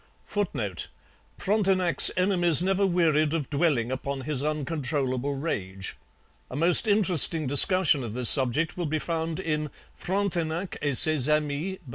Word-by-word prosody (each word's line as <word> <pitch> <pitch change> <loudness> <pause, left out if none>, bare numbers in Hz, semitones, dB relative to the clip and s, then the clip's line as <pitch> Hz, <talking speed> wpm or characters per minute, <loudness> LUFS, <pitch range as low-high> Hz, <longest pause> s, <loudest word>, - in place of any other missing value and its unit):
[Footnote: 120 - -4 0.5
Frontenac's 190 -4 +2
enemies 175 -3 +2
never 195 +1 +1
wearied 160 -3 +1
of 150 -4 -5
dwelling 140 -6 0
upon 135 +1 -5
his 140 -1 -3
uncontrollable 140 -3 -3
rage. 100 - -5 0.5
A - - -8
most 170 - +2
interesting 180 -6 +3
discussion 145 +1 +3
of 110 -3 -7
this 125 -2 +6
subject 140 +4 0
will 175 -3 -4
be 155 +1 -2
found 165 +1 -4
in 155 -4 -3 0.2
Frontenac 180 -2 -3
et 145 -4 +1
Ses 155 -3 +5
Amis 150 +5 -2
by 185 - -31
M. - - -14
155 Hz, 140 wpm, -25 LUFS, 140-180 Hz, 0.5 s, this